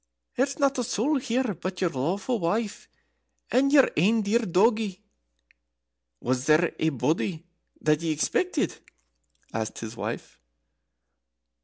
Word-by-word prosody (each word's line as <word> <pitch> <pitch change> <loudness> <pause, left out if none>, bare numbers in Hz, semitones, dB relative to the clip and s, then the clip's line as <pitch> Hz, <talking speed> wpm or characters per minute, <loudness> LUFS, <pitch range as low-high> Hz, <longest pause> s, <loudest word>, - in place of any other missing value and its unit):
"There's 275 +2 0
not 275 -2 +2
a - - +1
soul 255 +5 +1
here 250 -3 -1
but 185 +2 -5
your 180 -3 +1
lawful 190 - -1
wife 205 +5 -2 0.6
and 275 +2 +3
your 280 -2 +7
ain 215 +7 +3
dear 210 +4 +2
doggie. 215 -1 +2 1.2
Was 125 +1 -1
there 155 +2 +4
ae 160 - +2
body 160 +4 -1 0.4
that 150 0 +2
ye 165 - -1
expected?" 290 - 0 0.7
asked 110 0 -3
his 115 0 -6
wife. - - -6
195 Hz, 125 wpm, -26 LUFS, 160-245 Hz, 1.2 s, your